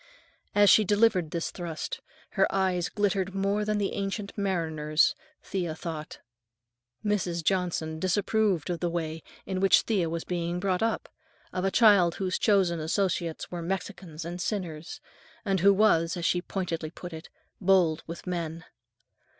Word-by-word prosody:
As 205 -1 +7
she 215 - +7
delivered 205 -4 +3
this 170 +1 -3
thrust, 170 -4 -5 0.3
her - - +3
eyes 185 -3 +1
glittered 195 -2 0
more 200 +2 +1
than 210 0 0
the 200 -1 -1
Ancient 200 +1 -3
Mariner's, 160 -6 +1 0.3
Thea 175 -5 -3
thought. 160 -3 -6 0.9
Mrs. 180 -5 0
Johnson 165 -4 0
disapproved 195 -1 +1
of 170 - -3
the 175 - 0
way 165 -1 -3 0.2
in 190 -1 -2
which 195 0 +5
Thea 190 -7 0
was 165 0 -3
being 175 0 -2
brought 185 0 0
up, 225 0 0 0.5
of 185 +1 -1
a - - +3
child 195 -6 +5
whose 185 -1 -1
chosen 190 -6 +3
associates 170 0 -1
were 175 -1 -4
Mexicans 175 -2 -5
and 175 +1 -5
sinners, 170 -5 -4 0.4
and 195 -2 +1
who 200 +3 +6
was, 180 -5 +3
as 170 - -3
she 175 - +2
pointedly 170 -4 -3
put 175 +1 -9
it, 160 +1 -9 0.3
"bold 180 -5 +3
with 165 +1 -7
men." 165 -2 -4
180 Hz, 150 wpm, -28 LUFS, 165-195 Hz, 0.9 s, As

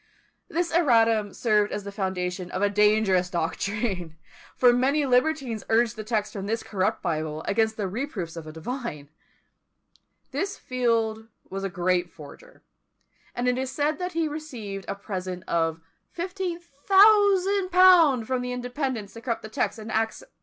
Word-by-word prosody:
This 340 0 -1
erratum 225 - +3
served 210 -3 +2
as 205 - -4
the 200 - -7
foundation 185 -2 -3
of 190 - -2
a 205 - +2
dangerous 210 -3 +3
doctrine; 180 0 -2 0.4
for 245 -1 +5
many 275 +4 +2
libertines 255 -3 +1
urged 230 0 +3
the 215 - -6
text 215 -1 -2
from 195 -1 -5
this 225 +2 -2
corrupt 190 -2 -1
Bible 155 -2 -2
against 220 +1 0
the 205 -3 -1
reproofs 195 - -4
of 165 -2 -8
a - - -7
divine. 160 - -6 1.2
This 395 0 -2
Field 225 -3 -1 0.2
was 195 0 -4
a 195 - -1
great 180 -1 0
forger; 170 - -14 0.7
and 245 +1 -1
it 250 0 +1
is 265 0 -3
said 300 +2 -1
that 360 0 -3
he 325 -1 0
received 240 -11 -6
a 200 - -3
present 185 -3 -5
of 165 -1 0 0.4
1500_l._ 370 - +4
from 255 +1 -1
the 250 0 -3
Independents 250 -4 -4
to 230 - -10
corrupt 230 -3 -3
a - - -8
text 220 - -1
in 220 0 -7
Acts 225 0 -1
vi. - - -16
225 Hz, 155 wpm, -26 LUFS, 195-280 Hz, 1.2 s, for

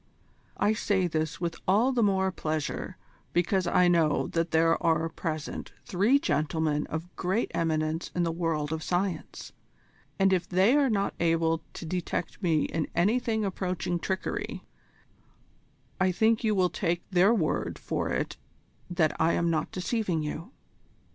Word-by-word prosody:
I 205 +2 +3
say 200 -3 +1
this 155 -2 -2
with 170 -1 -2
all 215 +8 +4
the 250 -2 +1
more 190 -2 +2
pleasure 155 -4 -3 0.4
because 180 +1 +1
I 180 0 +4
know 165 -4 +3
that 165 0 0
there 165 +1 +3
are 165 -1 +2
present 160 -2 -5
three 215 +5 +3
gentlemen 150 - 0
of 165 +3 -6
great 190 +6 -1
eminence 160 0 -1
in 175 - +1
the 165 - 0
world 160 -3 -1
of 160 - -3
science, 180 +3 -3 0.6
and 195 -1 +4
if 180 -2 0
they 190 +8 +4
are 285 -2 +4
not 200 -3 0
able 165 -1 +2
to - - -7
detect 180 +3 -3
me 160 -5 +2
in 160 -1 -2
anything 220 +3 +1
approaching 180 -2 -2
trickery, 190 +2 -3 1.4
I 185 0 +3
think 220 +5 +2
you 215 -2 +2
will 185 -2 +2
take 175 -2 -2
their 185 +3 +5
word 180 -10 0
for - - -2
it - - -2 0.5
that 175 -3 +1
I 165 +1 +4
am 170 -1 +1
not 160 - -1
deceiving 185 -4 -1
you. 155 +8 -5
175 Hz, 150 wpm, -28 LUFS, 160-195 Hz, 1.4 s, their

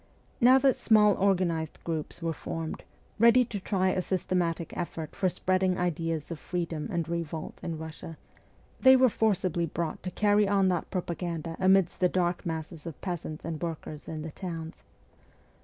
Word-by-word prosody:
Now 255 +2 +7
that 265 0 +4
small 210 -2 +5
organised 180 -5 0
groups 165 0 -4
were 165 -1 0
formed, 160 +1 -5 0.3
ready 235 +2 +6
to 215 -3 -5
try 190 -1 +1
a 185 - 0
systematic 175 -3 -1
effort 160 -2 -5
for 185 - +1
spreading 185 +1 +1
ideas 165 -2 -2
of 165 - -5
freedom 170 -3 -3
and 170 -2 -1
revolt 165 -2 -4
in 165 -1 -4
Eussia, 160 +1 -8 0.6
they 260 0 +8
were 260 -1 +5
forcibly 185 -6 +1
brought 165 0 -3
to 180 - -4
carry 205 +2 +3
on 195 -1 +3
that 175 -3 -1
propaganda 170 -3 -3
amidst 190 -1 +3
the 180 - +3
dark 175 -1 0
masses 160 -1 -5
of 165 - -7
peasants 165 -4 -5
and 160 -2 -4
workers 160 -3 -5
in 155 -1 -5
the 160 - -6
towns. 165 -2 -6
175 Hz, 160 wpm, -28 LUFS, 165-190 Hz, 0.6 s, they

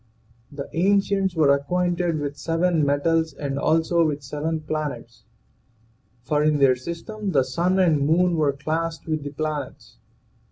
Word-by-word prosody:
The 140 -1 -6
ancients 195 +1 +1
were 150 -3 +4
acquainted 175 +3 0
with 145 -1 -4
seven 165 +1 0
metals 160 +2 +1
and 140 -1 -3
also 165 +2 +2
with 150 -3 -1
seven 155 +3 -3
planets,, 155 -1 -5 1.0
for 150 +4 0
in 150 0 +2
their 135 -2 +4
system 175 - -5
the 135 -3 +4
sun 170 +8 0
and 165 -6 +3
moon 175 +2 +3
were 150 -3 +2
classed 160 +3 -3
with 155 -2 -2
the 145 - -4
planets. 150 -1 -5
155 Hz, 145 wpm, -23 LUFS, 145-170 Hz, 1.0 s, were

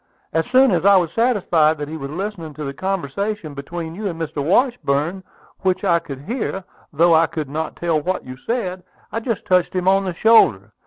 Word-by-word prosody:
As 160 +1 0
soon 260 +1 +5
as - - +1
I 200 0 +6
was 170 -3 +1
satisfied 175 -9 +2
that 145 -1 -5
he 155 - -6
was 140 -3 -6
listening 170 -2 -5
to 150 - -6
the 140 -1 -4
conversation 190 +1 -3
between 160 +4 -6
you 205 +4 -4
and 165 -3 -5
Mr. 155 -3 -3
Washburn, 185 - +1 0.4
which 185 -1 0
I 170 -1 +3
could 140 -5 -8
hear, 205 - -3 0.3
though 165 +2 +4
I 160 0 +5
could 155 -4 -5
not 160 +2 -3
tell 165 -3 0
what 185 +4 -2
you 130 - -8
said, 185 - -3 0.3
I 225 - -2
just 230 -2 -3
touched 180 -1 +2
him 180 0 -1
on 195 +1 +4
the 180 -2 -3
shoulder. 110 - +4
170 Hz, 205 wpm, -20 LUFS, 155-195 Hz, 0.4 s, I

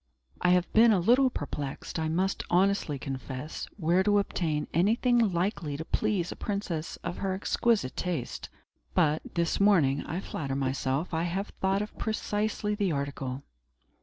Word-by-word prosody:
I 180 - +3
have 180 -1 +2
been 225 +1 +7
a 205 - +4
little 250 +9 +4
perplexed, 145 - -5
I 160 0 0
must 185 +4 0
honestly 185 -4 +2
confess, 135 +2 -5
where 175 0 +3
to 205 +1 +3
obtain 160 -6 0
anything 230 - +3
likely 170 -5 -1
to 160 - -5
please 200 -4 0
a - - -5
princess 190 -6 -3
of 175 - -4
her 190 -1 -1
exquisite 205 - +1
taste. 175 -9 -3 0.5
But, 155 -3 +3
this 170 -1 +1
morning, 165 -9 +4
I 170 - -2
flatter 140 -7 -4
myself, 135 +4 -1
I 160 +1 0
have 190 +4 -2
thought 195 +1 +2
of 210 - -9
precisely 210 -1 -1
the 205 -3 0
article." 140 -2 -3
175 Hz, 155 wpm, -29 LUFS, 150-200 Hz, 0.5 s, been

